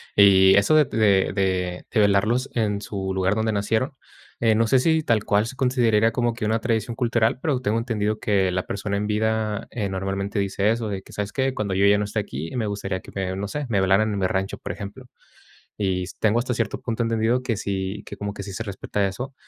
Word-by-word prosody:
Y 95 -1 +7
eso 100 +10 +4
de 155 -1 +6
de 100 -6 +2
de 95 -2 -1
de 115 - +1
velarlos 105 +5 +2
en 105 -3 0
su 95 -2 -4
lugar 95 +1 +1
donde 110 +1 0
nacieron. 110 +6 0 0.5
Eh, 115 -2 +3
no 115 +1 +2
sé 130 +4 +4
si 160 +3 +2
tal 115 -6 +1
cual 105 0 +2
se 130 - -7
consideraría 120 -4 +2
como 120 0 0
que 115 - -7
una 110 +2 +1
tradición 115 0 -1
cultural, 120 -1 +1
pero 140 -6 0
tengo 110 -2 0
entendido 110 -2 -1
que 95 -4 +1
la 90 0 -1
persona 100 0 -3
en 105 +1 -2
vida, 110 0 -1
eh, 105 -4 -2
normalmente 95 +1 -3
dice 100 +1 0
eso, 115 -1 -2
de 95 -2 -4
que: - - -16
"¿Sabes 105 0 -3
qué? 135 -1 0
Cuando 105 -5 -2
yo 95 +1 +3
ya 100 0 +5
no 105 - 0
esté 105 +2 -2
aquí, 80 -5 -5
me 115 - 0
gustaría 100 -2 -3
que - - -14
me 95 -1 -2
no 100 +1 -3
sé, 145 +7 -4
me 105 -4 +2
velaran 100 +3 +3
en 100 - -2
el 95 - +3
rancho", 95 +1 -2
por - - -6
ejemplo. 100 +5 -8 0.7
Y 95 -3 -1 0.2
tengo 110 +1 +3
hasta 125 +1 -1
cierto 115 -3 -2
punto 115 0 -2
entendido 115 +2 +1
que 120 -3 -1
sí, 100 0 -3
que - - -8
como 100 0 -4
que 100 - -6
sí 100 - -7
se 105 - -4
respeta 100 -1 -2
eso, 125 +8 -6
105 Hz, 230 wpm, -23 LUFS, 100-115 Hz, 0.7 s, Y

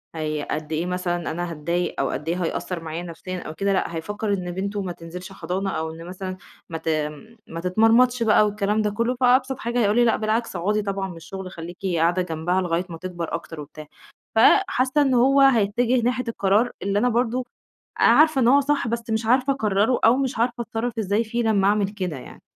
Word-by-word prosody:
هي 155 -2 -3
قد 155 0 -4
إيه 160 +2 -1
مثلًا 180 -1 -2
أنا 175 +1 -3
هاتضايق 170 +3 -2
أو 135 - 0
قد 150 +5 -4
إيه 180 +2 -1
هيأثّر 175 +1 -3
معايا 165 +2 -5
نفسيًا 180 +2 -6
أو 155 - -7
كده 195 +4 0
لأ، 170 -3 -1
هيفكّر 205 +5 -3
إن 180 -2 -3
بنته 200 +3 -3
ما 185 -2 -4
تنزلش 175 +3 -9
حضانة 190 +1 -3
أو 160 -3 -3
إن 165 +1 -10
مثلًا 185 +1 -6 0.3
ما 165 - -4
ت 160 - -12
آمم 155 +8 -3
ما 165 - -6
تتمرمطش 225 +7 +3
بقى 215 -1 +5
والكلام 210 +1 0
ده 210 - +1
كُلّه، 230 +5 -1
فأبسط 255 +1 +3
حاجة 235 +1 -1
هيقول 210 -2 +2
لي 240 0 +4
لأ 230 - +3
بالعكس، 220 0 -1
أقعدي 205 +5 0
طبعًا 195 -1 -3
من 180 - -9
الشغل 185 +3 -8
خلّيكِ 170 0 -8 0.2
قاعدة 170 +3 +2
جنبها 175 +2 -1
لغاية 175 0 -1
ما 165 - -7
تكبر 175 -1 -5
أكتر 165 -1 -5
وبتاع. 155 +1 -10 0.5
فحاسّة 260 - +4
إن 270 -2 +2
هو 270 +3 +4
هيتّجه 245 -1 +3
ناحية 250 +2 0
القرار 215 +2 +1
اللي 200 +1 0
أنا 250 +3 +2
برضه 245 +1 0 0.6
آآ، - - +4
عارفة 310 -3 +5
إن 235 - +4
هو 280 +3 +6
صح، 285 -3 0
بس 230 0 -3
مش 220 0 -1
عارفة 255 +4 +3
أقرّره 215 -1 +1
أو 230 +3 +6
مش 270 -2 -2
عارفة 240 +1 0
أتصرّف 230 +1 -4
إزاي 210 +1 +1
فيه 235 +2 -2
لمّا 205 -4 +2
أعمل 205 -1 +2
كده 185 -6 -4
يعني. 130 - -12
200 Hz, 210 wpm, -23 LUFS, 175-235 Hz, 0.6 s, هو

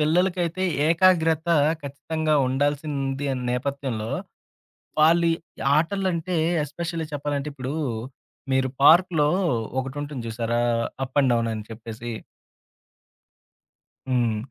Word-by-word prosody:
పిల్లలకైతే 175 +2 +1 0.3
ఏకాగ్రత 165 -2 +3 0.3
ఖచ్చితంగా 155 +2 -2
ఉండాల్సింది 140 0 -1 0.2
నేపథ్యంలో. 125 -3 -2 0.9
వాళ్ళు 170 +2 +5 0.5
ఆటలంటే, 180 0 0 0.3
ఎస్పెషల్లీ 165 +2 -4
చెప్పాలంటే 145 0 -2
ఇప్పుడు, 135 +1 -5 0.8
మీరు 130 0 +2
పార్కులో 160 -2 +6 0.5
ఒకటుంటుంది 135 -1 -5
చూసారా? 120 +1 -1 0.4
అప్ 130 +3 -7
అండ్ 130 -2 +3
డౌన్ 115 -1 +1
అని 110 -1 -6
చెప్పేసి. 115 +1 -7 2.0
హ్మ్. 120 -4 +1
145 Hz, 85 wpm, -24 LUFS, 130-165 Hz, 2.0 s, పార్కులో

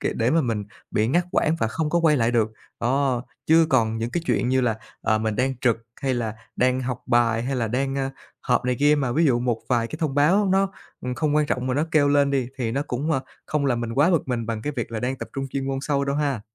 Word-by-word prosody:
kể - - -1
để 115 +2 +2
mà 165 +2 +4
mình 115 -6 -1 0.3
bị 105 +1 +1
ngắt 175 +6 +2
quãng 160 +1 +2
và - - +2
không 155 +4 -2
có 170 - +2
quay 160 -3 +4
lại 115 -2 +2
được. 110 -2 +1 0.3
Đó, 130 0 +1 0.2
chứ 160 +1 +5
còn 115 -4 +2
những 115 +1 -2
cái 175 - -2
chuyện 125 - +1
như 130 +1 +3
là, 120 -3 +1 0.3
ờ, 110 -1 +1
mình 110 -1 -1
đang 130 +1 0
trực 120 -3 +3 0.3
hay 130 -1 +1
là 115 -3 -2 0.2
đang 130 +1 +2
học 125 -1 -4
bài 120 -2 +2
hay 130 +2 -2
là 115 -3 0
đang, 135 +3 -1
ơ, 135 -1 -1 0.3
họp 125 -1 +1
này 125 0 0
kia 145 +1 +5
mà 135 -5 0
ví 165 +5 +3
dụ 125 -5 +3
một 120 -2 0
vài 120 -2 +2
cái 115 - -8
thông 155 -5 -1
báo 170 +9 +4
nó, 195 0 +2 0.3
ừm, 125 0 -3
không 150 +2 0
quan 150 -1 +3
trọng 125 -1 -1
mà 125 - 0
nó 150 +3 +1
kêu 145 -2 +4
lên 140 -1 +3
đi, 130 -3 0
thì 115 -3 -1
nó 140 +3 0
cũng, 140 +6 -2
ơ, 135 - +1 0.3
không 150 -2 0
làm 120 -3 +1
mình 115 -1 -3
quá 145 +7 +4
bực 165 -6 +1
mình 120 -3 -2
bằng 110 -2 -3
cái 150 - -2
việc 120 -1 -3
là 110 - -3
đang 130 +3 -1
tập - - -7
trung 135 - -2
chuyên 135 0 -3
môn 135 - -1
sâu 140 -1 0
đâu 140 0 -1
ha. 140 -6 0
130 Hz, 280 wpm, -24 LUFS, 120-145 Hz, 0.3 s, chứ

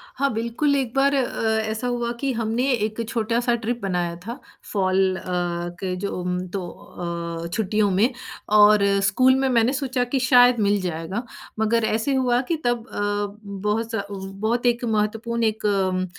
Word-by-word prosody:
हाँ, 280 0 +1
बिल्कुल, 235 +6 0
एक 255 -4 -1
बार 275 +1 +3
अ, 225 -4 0
ऐसा 220 +3 -3
हुआ 240 -1 -1
कि 275 0 0
हमने 230 +3 0
एक 220 -1 -1
छोटा-सा 235 +1 0
ट्रिप 235 +1 -3
बनाया 175 -3 -1
था, 235 +5 -6 0.3
फॉल 190 -1 +2
अ, - - -8 0.6
के 185 -1 -2
जो 200 +2 -3
उम, 180 0 -2
तो 185 -1 -4 0.8
अ, - - -3
छुट्टियों 210 -1 +1
में, 210 +7 +3 0.4
और 210 0 +6 0.2
स्कूल 255 +6 +4
में 265 0 +1
मैंने 240 +1 +3
सोचा 260 -2 -1
कि 245 +2 -1
शायद 245 -2 +5
मिल 205 -1 +2
जाएगा। 180 +5 -3 0.4
मगर 225 +1 +2
ऐसे 225 +6 0
हुआ 250 -2 +2
कि - - +3
तब 240 -1 0
अ, - - -5 0.7
बहुत 225 +2 0
स 210 - 0 0.5
बहुत 240 +2 0
एक 240 0 +2
महत्वपूर्ण 225 +2 -1
एक 220 -1 0
अम, 190 -2 +1
225 Hz, 165 wpm, -23 LUFS, 205-245 Hz, 0.8 s, और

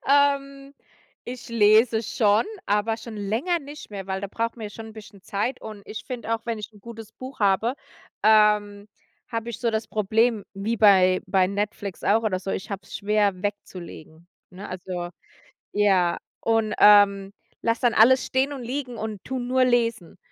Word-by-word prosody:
Ähm, 275 -1 +2 0.5
ich 250 0 -8
lese 220 0 +4
schon, 210 -1 +2 0.2
aber 210 +2 +1
schon 230 -1 -9
länger 225 - -1
nicht 290 -3 -11
mehr, 195 -2 -7
weil 190 0 -3
da 200 - -5
braucht 230 +3 -3
man 220 - -7
ja 205 - -6
schon 225 +2 -9
'n 220 - -11
bisschen 205 -3 -13
Zeit 215 +6 -3
und 215 -2 -9
ich 215 - -7
finde 235 -2 -3
auch, 225 - -4
wenn 230 -2 -2
ich 210 +1 -8
'n 210 - -18
gutes 225 0 -10
Buch 260 +2 -10
habe, 205 +5 +2 0.5
ähm, 210 -1 +3 0.4
habe 230 0 -4
ich 235 - -7
so 235 -2 0
das 220 0 -2
Problem 215 +1 +1
wie 210 +4 -2
bei 190 -4 +5
bei 185 -1 +3
Netflix 200 -1 -4
auch 220 +3 +3
oder 200 -4 0
so, 195 - -6
ich 190 - -5
habe 195 -1 -4
es - - -7
schwer 205 -2 0
wegzulegen, 170 -5 -7 0.2
ne? 190 +3 -9
Also, 180 -1 -5 0.6
ja 190 -4 +2 0.2
und, 225 -2 +1
ähm, 200 -1 +6 0.3
lasse 230 0 0
dann 240 -2 +3
alles 255 +4 +6
stehen 265 +2 0
und 270 - -6
liegen 250 0 -4
und 215 -3 -6
tue 260 0 -4
nur 255 +1 +2
lesen 230 -7 0
215 Hz, 180 wpm, -24 LUFS, 200-235 Hz, 0.6 s, ähm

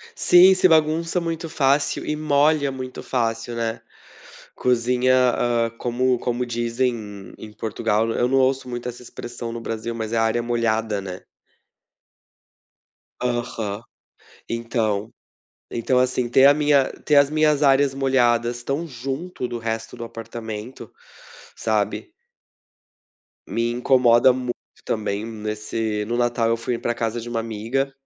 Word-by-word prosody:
Sim, 185 - +7
sim. 185 0 +4
Bagunça 160 +2 +2
muito 165 0 -4
fácil 140 -2 +1
e 150 - -2
molha 150 -1 +2
muito 130 -1 -7
fácil, 115 -1 -2
né. 115 -1 -2 0.7
Cozinha, 125 +1 +2 0.2
hã, 120 -1 +1
como 125 +1 +1
como 120 +1 -2
dizem 120 +2 0
em 105 -4 -9
em 110 - -10
Portugal 105 0 -1
eu 115 - 0
não - - -3
eu 120 - +3
não 135 +1 +3
ouço 130 0 +1
muito 120 0 -5
essa 125 0 -8
expressão 120 -1 -7
no 115 - -5
Brasil, 115 0 -4
mas 110 -1 -4
é - - 0
"área 115 +1 +1
molhada", 115 -3 0
né? 95 -1 -7 2.0
Aham. 115 -4 -3 0.7
Então 115 -3 -1 0.6
então 120 +2 0
assim, 125 -1 0
ter 130 +3 +6
a 140 - +8
minha 145 -2 +3
ter 150 - +2
as 140 -1 +6
minhas 155 -1 +2
áreas 135 0 +4
molhadas 120 -3 +1
tão 140 +6 -2
junto 135 +3 -5
do 120 - -4
resto 115 -1 -4
do - - -6
apartamento, 115 +1 -8 0.6
sabe - - -1 1.4
me 115 0 -1
incomoda 125 0 +4
muito 125 -1 -3 0.3
também. 105 -1 -2
Nesse 110 -1 -3
no 120 +2 -2
Natal 120 -1 +1
eu 115 - +2
fui 115 +1 -3
para 120 - -2
casa 115 0 -2
de 115 - -8
uma 115 -1 -2
amiga. 115 +5 -2
120 Hz, 140 wpm, -22 LUFS, 115-135 Hz, 2.0 s, a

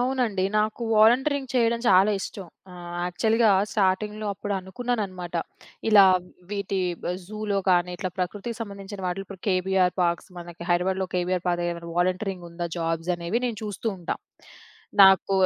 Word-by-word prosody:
అవునండి. 245 -7 0
నాకు 215 +2 -1
వాలంటీరింగ్ 265 +5 +4
చేయడం 235 -1 +2
చాలా 190 +3 +6
ఇష్టం. 190 -2 -6 0.2
ఆహ్, 175 -1 -8
యాక్చువల్‌గా 220 +5 +2 0.2
స్టార్టింగ్‌లో 210 +2 0
అప్పుడనుకున్నానన్నమాట. 190 -2 -3 0.5
ఇలా 200 -2 +9 0.5
వీటి 200 -1 -2 0.5
జూలో 210 -1 -2
కానీ, 180 0 +3
ఇట్లా 185 +1 -3
ప్రకృతికి 205 +5 -3
సంబంధించిన 200 -2 -7
వాటిలో. 190 +2 -3
ఇప్పుడు 195 -2 -11
కేబీఆర్ 185 -1 +2
పార్క్స్ 170 +2 -1
మనకి 170 -1 -9
హైదరాబాద్‌లో 185 +2 +1
ఉంది. 180 - -13
కేబీఆర్ 180 0 -1
పార్క్‌లో 175 0 0
ఏమైనా 170 0 -8
వాలంటీరింగ్ 185 0 -1
ఉందా, 170 0 -4
జాబ్సనేవి 170 +5 -1
నేను 225 -4 -4
చూస్తూ 210 +1 -5
ఉంటా. 175 - -3 0.9
నాకు 190 0 +6
190 Hz, 130 wpm, -25 LUFS, 180-215 Hz, 0.9 s, ఇలా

